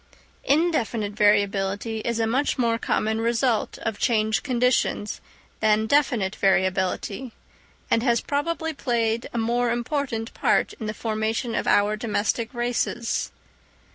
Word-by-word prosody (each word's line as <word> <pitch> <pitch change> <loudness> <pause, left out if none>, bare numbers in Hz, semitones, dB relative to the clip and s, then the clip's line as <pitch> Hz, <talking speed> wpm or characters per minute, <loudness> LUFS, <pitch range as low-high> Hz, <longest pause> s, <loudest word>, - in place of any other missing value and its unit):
In 325 +5 +3
definite 220 -7 -1
variability 205 +1 +1
is 235 +1 -2
a 225 - +2
much 260 +7 0
more 230 -2 +1
common 220 0 0
result 235 0 0
of 220 -2 -3
changed 220 -2 +1
conditions 250 -4 0 0.4
than 215 0 +3
definite 230 -7 +1
variability, 190 +5 0 0.6
and 230 - +4
has 235 -1 +2
probably 320 +4 -2
played 235 -4 -1
a - - -4
more 240 +2 +1
important 240 -1 -2
part - - +1
in 220 - -4
the 215 - -4
formation 220 +1 -2
of - - -1
our 205 +1 +3
domestic 220 +1 -1
races. 240 -1 -1
230 Hz, 130 wpm, -24 LUFS, 215-245 Hz, 0.6 s, and